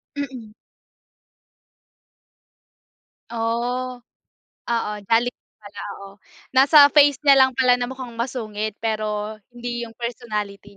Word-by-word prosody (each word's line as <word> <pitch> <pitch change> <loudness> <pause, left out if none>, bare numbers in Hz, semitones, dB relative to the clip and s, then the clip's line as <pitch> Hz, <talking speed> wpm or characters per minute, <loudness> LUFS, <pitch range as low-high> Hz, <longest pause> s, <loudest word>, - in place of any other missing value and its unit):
Mm. 255 -6 -6 2.8
Oh, 240 +2 -2 0.7
oo, 230 -3 -1 0.2
jolly 235 +2 +3
pala, 205 -1 -14
oo. 200 0 -13 0.3
Nasa 285 +2 +7
face 290 -2 +6
niya 275 -2 +7
lang 260 -1 +4
pala 255 -1 +4
na 245 - -1
mukhang 260 -2 -8
masungit. 220 -3 -4
Pero 215 -1 -2
hindi 240 -1 -5
yung 225 - -17
personality 210 -4 -5
235 Hz, 100 wpm, -22 LUFS, 215-255 Hz, 2.8 s, Nasa